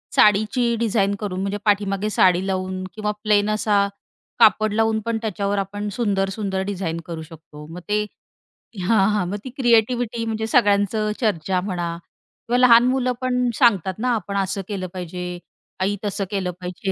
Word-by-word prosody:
साडीची 220 +4 +3
design 200 -3 +1
करून 190 -3 -4
म्हणजे 200 +1 -2
पाठीमागे 205 0 +1
साडी 185 -2 +3
लावून, 185 0 -2
किंवा 210 -1 -2
प्लेन 210 -1 +3
असा 210 -1 +2 0.5
कापड 215 0 +5
लावून 220 0 +2
पण 230 -1 0
त्याच्यावर 205 -1 -2
आपण 205 +2 -4
सुंदर-सुंदर 195 -2 -1
डिझाइन 180 -4 -3
करू 165 -2 -6
शकतो. 155 -2 -12
मग 180 - -7
ते 210 0 +1 0.8
हां, 195 +1 +3
हां 205 -3 0
मग 205 - -3
ती 260 - -6
क्रिएटिव्हिटी 235 -1 +2
म्हणजे 220 0 -2
सगळ्यांची 210 -1 +2
चर्चा 185 -5 0
म्हणा 175 -3 -3 0.5
किंवा 240 +1 +2
लहान 240 -1 +7
मुलं 255 -1 +1
पण 250 -1 +1
सांगतात 195 - +3
ना, 250 +2 0
आपण 200 -1 -3
असं 195 +1 -1
केलं 190 -3 -4
पाहिजे, 180 0 -5 0.4
आई 200 +2 +1
तसं 200 0 -2
केलं 190 -3 -1
पाहिजे 180 +2 -4
205 Hz, 155 wpm, -22 LUFS, 190-220 Hz, 0.8 s, लहान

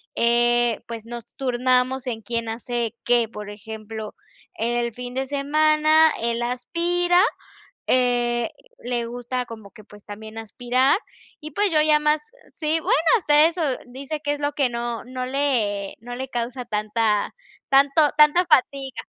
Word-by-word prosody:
eh, 240 0 +2
pues, 230 -1 -7
nos 235 -1 -7
turnamos 255 0 +1
en 225 -2 -3
quién 230 +1 -3
hace 235 0 -3
qué. 240 -2 +3
Por 210 -2 -8
ejemplo, 220 0 -8 0.4
en 235 +2 -1
el 235 -1 -1
fin 245 +1 -7
de 265 0 -1
semana 310 +2 +4
él 235 0 -1
aspira, 345 +8 +1 0.7
eh, 240 -2 +1 0.3
le 240 -1 -2
gusta 245 +1 -4
como 220 -4 -11
que, 215 -3 -15
pues, 205 -1 -16
también 220 +2 -9
aspirar 245 - +1 0.4
y 305 0 -8
pues, 405 +3 +1
yo 305 -1 +4
ya 305 -1 +4
más 300 0 +2 0.3
Sí, 315 +1 0
bueno, - - +1 0.2
hasta 300 -4 +5
eso 340 0 -4 0.3
dice 275 +5 -6
que 290 0 0
es 290 - -6
lo 290 0 0
que 280 -3 +2
no, 235 -1 -4
no 255 0 -5
le 240 -8 0
no 245 +1 -7
le 265 +1 -5
causa 245 +1 -3
tanta 215 0 0 0.4
tanto 280 +2 +4
tanta 305 +4 +6
fatiga. 275 -3 +1
245 Hz, 155 wpm, -23 LUFS, 230-290 Hz, 0.7 s, tanta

